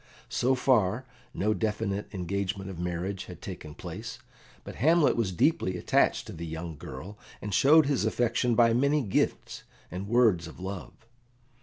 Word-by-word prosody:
So 130 +2 +2
far, 125 -2 +2 0.3
no 105 +5 0
definite 105 -2 -2
engagement 95 +1 -3
of 85 - -9
marriage 90 +3 -3
had 90 -3 -10
taken 75 -1 -8
place, - - -7 0.5
but - - -9
Hamlet 160 +2 +4
was 115 -5 0
deeply 95 - +1
attached - - +2
to - - -8
the 85 +1 -6
young 80 0 -5
girl, 100 +7 -9 0.2
and 105 -1 -5
showed 150 +7 +6
his 140 -5 +1
affection 120 +2 +1
by 115 -1 +5
many 140 +4 +2
gifts 100 - -1 0.3
and 95 +3 -5
words 110 -9 +3
of 80 - -12
love. 95 0 -6
100 Hz, 155 wpm, -28 LUFS, 90-120 Hz, 0.5 s, showed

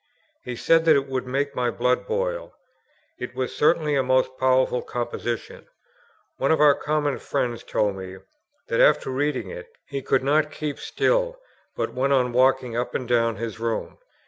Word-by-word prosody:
He 125 - -5
said 165 +7 +3
that 160 -2 +6
it 140 -1 +1
would 130 -1 -3
make 140 +2 -1
my 125 -1 +1
blood 125 +2 0
boil. - - -2 0.6
It 125 0 -6
was 130 -1 -3
certainly 150 -1 +2
a 135 - +3
most 130 0 +1
powerful 130 -1 +2
composition. 120 -1 -5 0.7
One 135 - +1
of 160 - +3
our 150 -1 +7
common 145 -1 -1
friends 120 -4 -2
told 100 -2 -1
me, 95 0 -8 0.5
that, - - -1
after - - +4
reading 130 -7 -1
it, 90 - -8 0.2
he 140 -1 -5
could 130 0 +1
not 150 +2 +2
keep 150 -2 -5
still, - - 0 0.4
but - - -2
went 135 +2 +1
on 125 -2 +2
walking 130 -1 +2
up 120 +1 -2
and 125 - -2
down 115 -1 +2
his 115 -2 -5
room. 115 -1 -3
130 Hz, 170 wpm, -24 LUFS, 120-145 Hz, 0.7 s, our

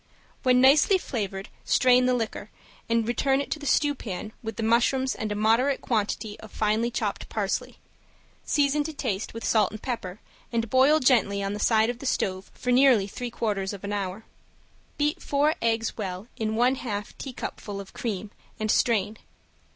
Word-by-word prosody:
When 250 -1 +4
nicely 285 +9 +6
flavored 200 - -4 0.2
strain 250 -1 +4
the 255 - +3
liquor, 220 -3 -4 0.4
return 240 +4 +1
it 280 - -4
to 310 - -2
the 290 - -6
stewpan 225 -10 0
with 225 -1 -5
the 225 - -3
mushrooms 245 +4 +2
and 215 -2 -4
a - - -1
moderate 230 +6 +2
quantity 210 -1 -2
of 220 - -12
finely 215 +2 +1
chopped 240 - -3
parsley, - - -2 0.7
season 290 0 +2
to 315 - -4
taste 225 -7 -3
with 230 - -5
salt 215 -4 +3
and 215 - -8
pepper, 215 -6 -5 0.3
and 230 -2 -1
boil 270 +4 +5
gently 215 -6 +3
on 195 0 -2
the 205 - -5
side 220 +2 +3
of 245 - -11
the 275 - -5
stove 185 -5 -1
for 250 - -2
nearly 250 -5 +5
three 240 +5 -5
quarters 205 -4 -2
of 200 - -9
an 200 +1 -3
hour. 200 +1 -4 0.7
Beat 300 +4 0
four 290 +2 +2
eggs 225 0 0
well 190 -1 -5
in 220 -3 -2
one 250 +3 +3
half 205 -4 -4
teacupful 215 -6 -6
of 195 -1 -10
cream, 210 -3 -4 0.3
and 215 0 +1
strain. 215 -2 +1
230 Hz, 175 wpm, -26 LUFS, 210-255 Hz, 0.7 s, nicely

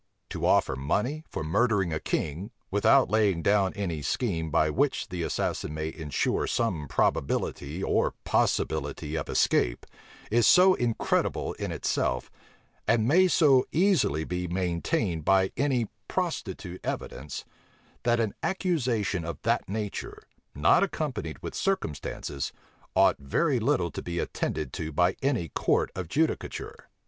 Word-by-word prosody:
To - - -1
offer - - +3
money 105 - -1
for - - -4
murdering 100 +1 +1
a 80 - -1
king, 80 +9 -2 0.2
without 105 +7 +4
laying 100 -6 +2
down 100 -2 +3
any 85 -7 -3
scheme 80 - -1
by 80 0 +2
which 140 - 0
the 90 -1 -4
assassin 75 -2 -2
may 80 +1 -3
insure 80 -5 -1
some 90 -11 -1
probability 70 +5 -1
or - - +1
possibility 75 +1 0
of 80 - -3
escape, - - +2 0.5
is 115 -1 +4
so 185 +1 +7
incredible 120 -8 0
in - - -4
itself, 65 0 -1 0.6
and 110 0 +3
may 180 +7 +5
so 145 -7 +5
easily 165 - +2
be 90 +2 -3
maintained 90 - -1
by 95 +2 +3
any 130 -4 +1 0.2
prostitute 90 +1 -3
evidence, 70 -1 -5 0.6
that 120 0 +2
an 110 -3 0
accusation 125 - 0
of 80 -3 -5
that - - 0
nature, 105 0 -4 0.3
not 75 +3 +4
accompanied 140 - -2
with - - -5
circumstances, 75 - -2 0.4
ought - - +4
very 125 - +1
little 90 -6 +1
to - - -5
be 85 0 -5
attended 75 -4 -2
to 80 -1 -4
by 90 +4 +2
any 125 - 0
court - - +1
of 95 -3 -5
judicature. 155 - -2
95 Hz, 135 wpm, -28 LUFS, 80-125 Hz, 0.6 s, so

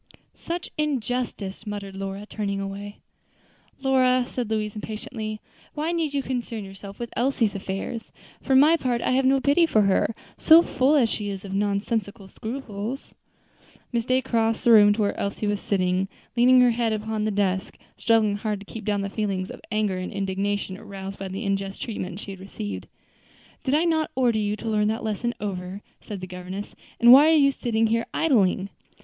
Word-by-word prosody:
"Such 345 +1 -5
injustice!" 245 -7 -2
muttered 200 -2 -5
Lora, 195 +1 -5
turning 200 -2 -3
away. 200 +1 -6 0.8
"Lora," 255 -2 +3
said 245 -4 -4
Louise, 215 -1 -1
impatiently, 215 0 -5 0.4
"why 310 +2 -1
need 320 -4 -1
you 275 - 0
concern 240 -4 -3
yourself 195 0 -10
with 235 -1 -6
Elsie's 240 -3 +1
affairs? 195 +4 -5 0.3
for 265 - +1
my 300 +5 +7
part, 245 -5 -1
I - - +1
have 260 +1 +2
no 270 +1 +4
pity 290 +5 +4
for 215 -9 +3
her, 195 +3 +2 0.2
so 325 +2 +8
full 270 0 +2
as 260 -6 +4
she 210 -2 -3
is 195 0 -6
of 195 - -6
nonsensical 200 +1 -1
scruples." 225 +2 -6 0.8
Miss 235 -1 +1
Day 255 +1 +2
crossed 225 -1 0
the 240 - +5
room 205 -2 +8
to 215 - -2
where 205 - 0
Elsie 200 +2 -2
was 205 -1 0
sitting 185 -1 0 0.3
leaning 250 +1 +6
her 245 -1 +5
head 230 -1 0
upon 215 0 -2
the 215 - +1
desk, 195 -2 -1 0.2
struggling 220 -3 +2
hard 210 -1 -2
to - - -11
keep 220 +2 -8
down 205 -1 0
the 200 - -2
feelings 195 -4 -2
of - - -10
anger 210 -4 0
and 185 - -5
indignation 195 0 -2
aroused 195 0 -8
by 195 - -4
the 195 +4 -5
unjust 195 0 -2
treatment 190 -5 -5
she 200 - -7
had 190 - -9
received. 100 - -6 0.8
"Did 265 - +1
I 315 - +3
not 320 -2 +1
order 245 -4 +2
you 210 0 0
to 225 - -8
learn 210 -1 +2
that 220 +1 -1
lesson 225 +2 -2
over?" 190 -1 -5 0.2
said 200 -3 -7
the - - -4
governess, 185 +2 -7 0.3
"and 235 0 +8
why 290 +4 +8
are 320 - +5
you 280 -2 +5
sitting 230 -4 0
here 230 +1 0
idling?" 200 - +2
215 Hz, 185 wpm, -25 LUFS, 195-245 Hz, 0.8 s, so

